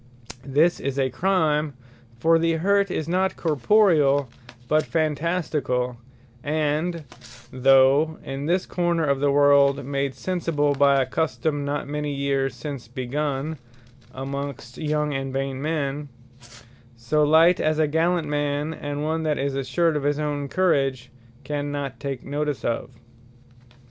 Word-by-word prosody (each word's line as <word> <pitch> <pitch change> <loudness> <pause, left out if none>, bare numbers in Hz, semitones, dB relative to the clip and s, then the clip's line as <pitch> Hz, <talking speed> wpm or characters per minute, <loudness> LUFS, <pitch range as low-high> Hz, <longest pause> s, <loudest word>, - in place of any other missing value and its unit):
This 155 +6 +3
is 140 0 -3
a 135 -2 +1
Crime; 155 -3 +1 0.4
For 165 +6 +3
the 165 0 +1
hurt 200 +4 +2
is 160 -3 -3
not 185 +2 0
Corporeall, 150 - +3 0.4
but 155 +3 +3
Phantasticall, 150 -6 -1 0.5
and 155 +3 -1 0.5
(though 135 +4 +4
in 135 +2 -5
this 180 +2 +1
corner 175 -2 0
of 140 -2 +1
the 145 +1 +2
world, 140 -1 +4
made 140 -1 -2
sensible 165 -6 0
by 140 0 +4
a 130 - +2
custome 150 +1 -1
not 145 0 -3
many 150 0 -3
years 140 -1 -1
since 140 -6 -7
begun, 135 +4 -3 0.5
amongst 135 -2 -6
young 150 -1 -1
and 135 -1 -3
vain 135 0 -3
men,) 145 -2 -2 0.9
so 120 +6 0
light, 160 +4 +5
as 155 0 +1
a 155 - +3
gallant 165 +2 +1
man, 145 +1 -1
and 145 -1 -5
one 160 +1 -1
that 155 -2 0
is 140 0 -1
assured 160 +5 0
of 150 - 0
his 145 +1 0
own 145 -2 -2
courage, 135 -8 0 0.3
cannot 145 -2 -4
take 140 -3 -5
notice 145 -3 -3
of. 120 +1 -2
145 Hz, 135 wpm, -24 LUFS, 135-160 Hz, 0.9 s, light